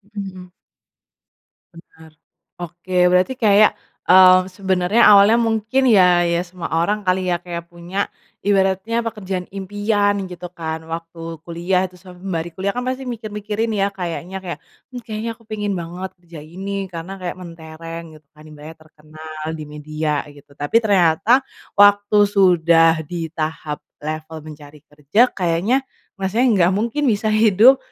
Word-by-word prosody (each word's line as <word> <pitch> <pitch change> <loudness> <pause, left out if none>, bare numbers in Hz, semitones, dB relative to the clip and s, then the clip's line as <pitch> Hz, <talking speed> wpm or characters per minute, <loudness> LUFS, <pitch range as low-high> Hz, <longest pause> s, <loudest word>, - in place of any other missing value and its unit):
Hmm. 185 -2 -7 1.2
Bener, 160 -1 -16 0.5
oke, 175 +2 -8 0.2
berarti 185 +8 +3
kayak, 210 -1 +4 0.3
eee, 185 0 +8
sebenarnya 190 +3 0
awalnya 205 +3 +7
mungkin, 225 +3 0
ya, 180 -6 +5
ya 170 0 +1
semua 180 -1 -7
orang 200 +5 0
kali, 185 0 +1
ya, 175 - +1
kayak 170 -1 -8
punya 175 +3 -4 0.3
ibaratnya 200 +3 +1
pekerjaan 190 -5 -4
impian, 205 +1 0
gitu 180 -1 -8
kan, 160 -2 -5
waktu 165 0 -7 0.3
kuliah 175 +2 0
itu, 180 - -10
se 185 - -14
sembari 180 -2 -5
kuliah, 195 +1 -2
kan, 245 - -3
pasti 260 +1 -3
mikir-mikirin, 215 -1 -4
ya, 195 0 +2
kayaknya 180 0 -5
kayak, 175 -2 -6 0.3
hmm, 250 -1 -8
kayaknya 220 0 -4
aku 230 - -24
pingin 205 -2 -3
banget 175 +3 -6
kerja 170 -3 -12
ini 185 +6 -8 0.2
karena 170 +2 -7
kayak 175 0 -4
mentereng, 165 -1 -9
gitu 155 - -25
kan, 155 0 -17
ibaratnya 155 +2 -12
terkenal 155 0 -11
di 155 -1 -6
media, 150 0 -3
gitu, 145 0 -19
tapi 145 +10 +1
ternyata 205 +6 +3 0.3
waktu 205 +1 +5
sudah 170 -5 +3
di 165 0 -5
tahap 155 -2 -4 0.2
level 155 +1 -5
mencari 150 -1 -12
kerja, 150 - 0
kayaknya 190 +9 0 0.3
masalahnya 195 -1 +2
gak 185 - +1
mungkin 235 +7 -2
bisa 215 -1 +1
hidup 220 +4 +5
185 Hz, 140 wpm, -20 LUFS, 165-205 Hz, 1.2 s, eee